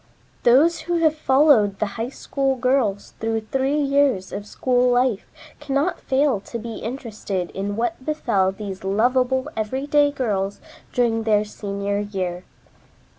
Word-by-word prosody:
Those 285 +8 +4
who 345 - +2
have 320 -2 +3
followed 265 -9 +4
the 215 - 0
"High 230 +2 -3
School 270 0 -1
Girls" 250 -6 0
through 225 0 -1
three 270 +6 0
years 275 -9 +1
of 205 +1 -5
school 250 +2 +1
life 245 -4 +1 0.3
cannot 280 +6 -1
fail 270 -4 +1
to 235 - -7
be 230 0 -6
interested 215 -7 -4
in 200 +1 -3
what 240 +6 -2
befell 230 -11 +1
these 195 -1 -7
lovable 250 +6 +1
everyday 275 +6 +1
girls 205 -8 -2 0.3
during 235 -2 +1
their 215 -1 +2
senior 200 -1 -3
year. 185 -3 -4
235 Hz, 135 wpm, -22 LUFS, 205-270 Hz, 0.3 s, Those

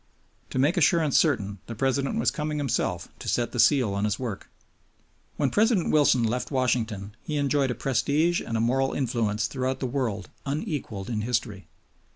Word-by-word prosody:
To - - -5
make 145 +8 +2
assurance 165 -3 +3
certain 105 - +2
the 115 - -6
President 135 - 0
was - - +2
coming 150 0 -3
himself 140 -4 -1
to - - -8
set 120 -1 0
the 120 - -4
seal 125 -6 +4
on 100 +1 -1
his 105 - 0
work. 115 -6 -5 0.9
When 140 -3 0
President 215 -4 +2
Wilson 145 -5 +4
left 120 +3 -1
Washington 115 -6 -1
he 150 - -3
enjoyed 140 -1 +1
a 125 - -2
prestige 145 +7 +1
and 115 - -3
a - - 0
moral 130 +3 +1
influence 115 -5 0
throughout 130 +1 -2
the - - -2
world 120 -7 -2
unequaled 140 - -4
in 110 -3 -2
history. 110 -4 -2
130 Hz, 175 wpm, -26 LUFS, 110-145 Hz, 0.9 s, seal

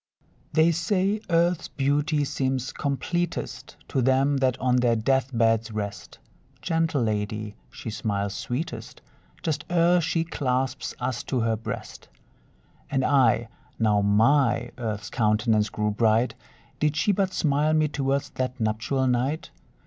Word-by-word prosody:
They 160 +2 +4
say, 190 +5 0
Earth's 170 +1 +2
beauty 145 +2 0
seems 130 -1 -1
completest 160 +5 -3
To 135 - 0
them 135 +3 +3
that 130 -1 +1
on 125 -1 +2
their 120 -2 +3
death 130 +3 +1
beds 115 -1 +2
rest; 100 -4 -6 0.4
Gentle 165 -5 0
lady! 105 -1 -2
she 120 -6 -7
smiles 100 -2 -2
sweetest 120 0 -5 0.4
Just 150 -3 -1
ere 175 0 +4
she 165 0 0
clasps 130 -4 -2
us 125 -1 -2
to 130 -3 -1
her 115 0 +1
breast. 110 - -7 0.8
And 135 -2 0
I, 120 -5 +3 0.3
now 105 -2 +3
my 115 +3 +3
Earth's 105 -3 -4
countenance 110 -1 +2
grew 105 0 -1
bright, 110 +2 +2 0.5
Did 150 0 +1
she 170 +7 +2
but 195 -1 +1
smile 150 -1 +1
me 155 -1 +3
towards 140 0 -1
that 130 -2 -3
nuptial 115 +5 0
night? 130 +8 0
130 Hz, 135 wpm, -25 LUFS, 115-150 Hz, 0.8 s, They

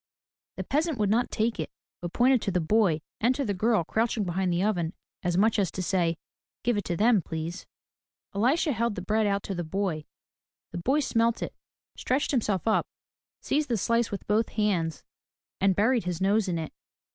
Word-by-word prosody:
The - - -3
peasant 310 0 0
would 205 -2 +1
not 235 +3 +2
take 225 -2 -1
it, 155 - -2 0.3
but 175 -1 -4
pointed 250 +2 +4
to 195 - -1
the 180 - +1
boy 170 -2 +2 0.2
and 245 +4 +3
to 280 - -1
a 205 -6 -1
girl 215 0 +2
crouching 220 +4 0
behind 185 0 0
the 175 +2 +1
oven 175 -5 0 0.3
as 175 -1 0
much 215 +2 +3
as 195 - +2
to 185 - -3
say, 170 -3 +1 0.5
Give 240 0 +2
it 205 - -2
to 175 - -2
them, 220 0 +4
please." 165 +2 -5 0.7
Elisha 265 - +2
held 235 -3 0
the 180 - -5
bread 215 +2 +1
out 200 0 0
to 195 - -4
the 175 -1 -3
boy. 165 -2 -2 0.7
The 175 - -4
boy 270 - +2
smelt 230 -3 +1
it, - - -5 0.4
stretched 265 +3 0
himself 215 - 0
up, 220 - +2 0.5
seized 295 0 0
the 235 - +1
slice 230 +3 +1
with 200 - -5
both 215 +2 +1
hands 175 -8 0 0.6
and 195 -1 +3
buried 225 +1 +2
his 180 -2 -2
nose 200 +2 +2
in 175 -2 -1
it. 160 -1 -5
205 Hz, 195 wpm, -27 LUFS, 180-230 Hz, 0.7 s, pointed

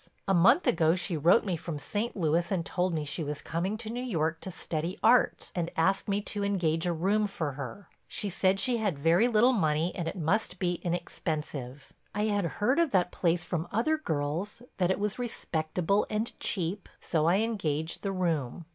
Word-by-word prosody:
A 195 - +3
month 235 - +5
ago 165 0 +3
she 175 -1 -2
wrote 170 +10 +4
me 185 -3 0
from 165 -1 -5
St. 210 +9 -3
Louis 170 +1 +1
and 175 -4 0
told 180 0 0
me 155 -2 -2
she 150 +3 -3
was 150 0 -4
coming 185 +6 -2
to 220 0 -6
New 245 +1 -3
York 165 -9 -1
to - - -6
study 170 0 -3
art 245 +3 +3
and 170 -2 -1
asked 190 +4 +2
me 200 +1 +1
to 205 -1 -2
engage 175 -5 +1
a - - +2
room 200 +6 +1
for 160 -7 -3
her. 140 - -7 0.2
She 205 - -2
said 190 0 +2
she 240 +4 +1
had 205 -9 -1
very 165 +10 +4
little 240 +2 +4
money 160 -4 +1
and 170 -3 -3
it 165 - -3
must 180 +7 0
be 175 -2 -1
inexpensive. 150 -6 -4 0.2
I 210 - 0
had 205 -3 +1
heard 255 +9 +2
of 335 -2 +3
that 180 -6 +2
place 175 -1 +1
from 170 -1 -3
other 240 +9 +2
girls—that 175 - -2
it 190 - +2
was 210 +3 -2
respectable 180 -4 0
and 215 +2 -1
cheap—so 170 -3 -1
I 175 - +5
engaged 165 -9 -2
the 195 - -2
room. 165 -5 -1
180 Hz, 190 wpm, -29 LUFS, 160-205 Hz, 0.2 s, month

